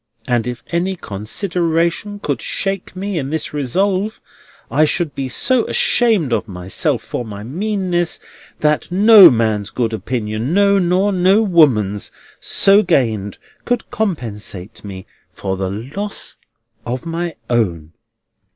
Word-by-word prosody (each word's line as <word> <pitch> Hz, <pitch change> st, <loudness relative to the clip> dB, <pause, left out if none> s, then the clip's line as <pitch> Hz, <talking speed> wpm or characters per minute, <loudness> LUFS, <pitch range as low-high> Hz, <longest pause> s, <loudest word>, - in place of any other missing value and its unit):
And 120 Hz, -2 st, 0 dB
if 125 Hz, -1 st, -5 dB
any 180 Hz, +3 st, 0 dB
consideration 170 Hz, -, -2 dB
could -, -, -3 dB
shake 195 Hz, -1 st, -3 dB
me 190 Hz, -1 st, -3 dB
in 135 Hz, -2 st, -4 dB
this 160 Hz, 0 st, -3 dB
resolve, 190 Hz, -, 0 dB, 0.5 s
I 145 Hz, +5 st, +3 dB
should 155 Hz, 0 st, 0 dB
be 135 Hz, -1 st, -4 dB
so 245 Hz, -, +1 dB
ashamed 210 Hz, -, +2 dB
of 115 Hz, 0 st, -1 dB
myself 90 Hz, -1 st, -2 dB
for -, -, -4 dB
my 105 Hz, -2 st, -8 dB
meanness, 180 Hz, -, -1 dB, 0.4 s
that 150 Hz, +2 st, +1 dB
no 200 Hz, 0 st, +9 dB
man's 110 Hz, -5 st, 0 dB
good 115 Hz, -2 st, -2 dB
opinion—no, 125 Hz, -, +1 dB
nor 185 Hz, +3 st, +2 dB
no 190 Hz, +4 st, +4 dB
woman's—so 155 Hz, -, +2 dB
gained, 115 Hz, -, 0 dB, 0.3 s
could 245 Hz, -1 st, -2 dB
compensate 110 Hz, -, -4 dB
me 95 Hz, -2 st, -8 dB, 0.3 s
for 95 Hz, -1 st, -3 dB
the 95 Hz, 0 st, -3 dB
loss 140 Hz, -, -5 dB, 0.5 s
of 125 Hz, +1 st, -4 dB
my 165 Hz, 0 st, -3 dB
own." 85 Hz, -10 st, -1 dB
155 Hz, 125 wpm, -18 LUFS, -, 0.5 s, no